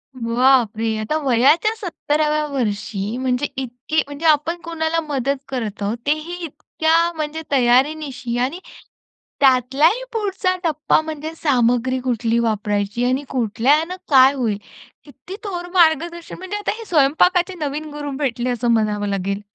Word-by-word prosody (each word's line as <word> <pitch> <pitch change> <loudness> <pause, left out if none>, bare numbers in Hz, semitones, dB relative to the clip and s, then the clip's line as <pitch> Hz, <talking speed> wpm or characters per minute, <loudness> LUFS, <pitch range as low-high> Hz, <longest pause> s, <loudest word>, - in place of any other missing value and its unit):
बापरे! 230 -2 +2
आता 215 +9 -1
वयाच्या 280 - +3
17 310 -5 -1
व्या 300 0 0
वर्षी 215 -3 -2
म्हणजे 255 +2 0
इतकी 260 +5 -2
म्हणजे 285 +3 -7
आपण 310 +2 +3
कोणाला 330 0 -1
मदत 275 -1 0
करत 225 -6 -4
आहोत. 215 +4 -1
तेही 310 +4 -1
इतक्या 320 +3 0
म्हणजे 310 0 -4
तयारीनिशी 260 -1 +1
आणि 270 +9 -1 0.8
त्यातलाही 275 - +3
पुढचा 390 -4 -1
टप्पा 310 -2 +2
म्हणजे 315 0 -6
सामग्री 255 -2 +1
कुठली 235 -2 0
वापरायची 210 0 -1
आणि 265 +3 0
कुठल्यानं 270 - +1
काय 265 0 +7
होईल? 225 -6 -1 0.5
किती 290 +6 -11
थोर 355 -4 -5
मार्गदर्शन 340 0 +2
म्हणजे 375 +3 -5
आता 415 - -2
हे 455 - -9
स्वयंपाकाचे 350 +4 +3
नवीन 300 +1 -4
गुरु 290 -1 -5
भेटले 250 -3 -1
असं 240 -1 0
म्हणावं 210 -2 +1
लागेल. 195 +1 -2
275 Hz, 130 wpm, -20 LUFS, 240-315 Hz, 0.8 s, काय